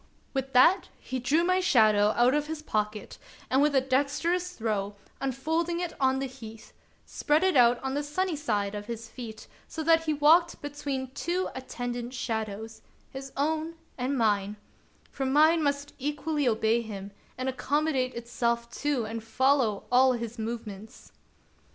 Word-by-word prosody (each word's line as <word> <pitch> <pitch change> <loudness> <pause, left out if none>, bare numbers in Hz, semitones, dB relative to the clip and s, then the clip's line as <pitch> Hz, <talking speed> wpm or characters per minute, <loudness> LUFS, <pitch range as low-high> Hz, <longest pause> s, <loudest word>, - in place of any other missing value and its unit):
With 270 -1 -3
that 300 +10 +5
he 260 - -5
drew 290 +7 +2
my 365 +1 +2
shadow 215 - +4
out 245 +2 +5
of 295 0 0
his 315 -1 -5
pocket, 210 -4 -3 0.3
and 265 +2 +4
with 295 -1 +3
a 265 - +5
dexterous 290 +7 0
throw, 205 - -2 0.2
unfolding 320 +6 -1
it 350 -2 -3
on 265 -1 +3
the 270 - -2
heath, 225 -4 -11 0.3
spread 300 +4 +1
it 375 -3 +2
out 240 -1 +5
on 265 0 -2
the 290 - 0
sunny 325 +4 -1
side 210 -9 -1
of 205 0 -6
his 230 -1 -6
feet, 225 -3 -9 0.2
so 320 - -5
that 325 0 +4
he 310 - +1
walked 325 +4 +4
between 280 -3 -4
two 355 +6 -2
attendant 245 -1 -5
shadows, 220 -2 -4 0.2
— - - -35
his 270 0 -7
own 315 +3 -1 0.2
and 265 +2 -1
mine, 205 -3 +1 0.3
— - - -33
for 270 -1 -3
mine 310 +4 +5
must 285 -1 -1
equally 295 +1 -1
obey 225 0 +2
him, 200 -3 -7 0.3
and 255 +1 -3
accommodate 265 0 0
itself 235 0 -2
to 285 -6 0
and 225 0 -5
follow 245 -2 +2
all 255 +1 +5
his 235 -1 -5
movements. 220 -1 -7
260 Hz, 165 wpm, -28 LUFS, 230-295 Hz, 0.3 s, that